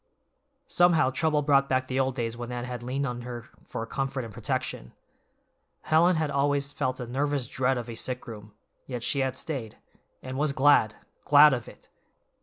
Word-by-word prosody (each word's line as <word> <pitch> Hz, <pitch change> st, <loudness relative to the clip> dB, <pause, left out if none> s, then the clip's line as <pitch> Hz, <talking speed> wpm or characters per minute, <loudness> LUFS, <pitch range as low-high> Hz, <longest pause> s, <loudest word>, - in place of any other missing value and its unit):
Somehow 175 Hz, -, +3 dB
trouble 150 Hz, +1 st, +1 dB
brought 140 Hz, -1 st, +3 dB
back 130 Hz, 0 st, +1 dB
the 130 Hz, 0 st, -2 dB
old 130 Hz, -1 st, 0 dB
days 115 Hz, -2 st, -3 dB
when 120 Hz, +1 st, -6 dB
Anne 120 Hz, 0 st, -4 dB
had 125 Hz, -1 st, -6 dB
leaned 130 Hz, +3 st, -2 dB
on 120 Hz, -2 st, -4 dB
her 120 Hz, -1 st, -7 dB, 0.2 s
for 115 Hz, -, -4 dB
comfort 135 Hz, +1 st, -3 dB
and 110 Hz, -, -10 dB
protection. -, -, -3 dB, 0.9 s
Helen 170 Hz, +3 st, +3 dB
had 155 Hz, -2 st, -1 dB
always 140 Hz, 0 st, 0 dB
felt 130 Hz, 0 st, -2 dB
a 125 Hz, -, -4 dB
nervous 140 Hz, +2 st, -1 dB
dread 130 Hz, 0 st, 0 dB
of 120 Hz, -1 st, -5 dB
a 120 Hz, -, -6 dB
sick 125 Hz, +2 st, -4 dB
room, 105 Hz, -2 st, -10 dB, 0.4 s
yet 125 Hz, -3 st, -5 dB
she 140 Hz, -, 0 dB
had 130 Hz, -1 st, -1 dB
stayed, 130 Hz, -10 st, -5 dB, 0.5 s
and 130 Hz, +1 st, -5 dB
was 150 Hz, -1 st, +1 dB
glad—glad 145 Hz, +2 st, +4 dB
of 120 Hz, -3 st, -3 dB
it! -, -, -15 dB
130 Hz, 180 wpm, -27 LUFS, 120-145 Hz, 0.9 s, glad—glad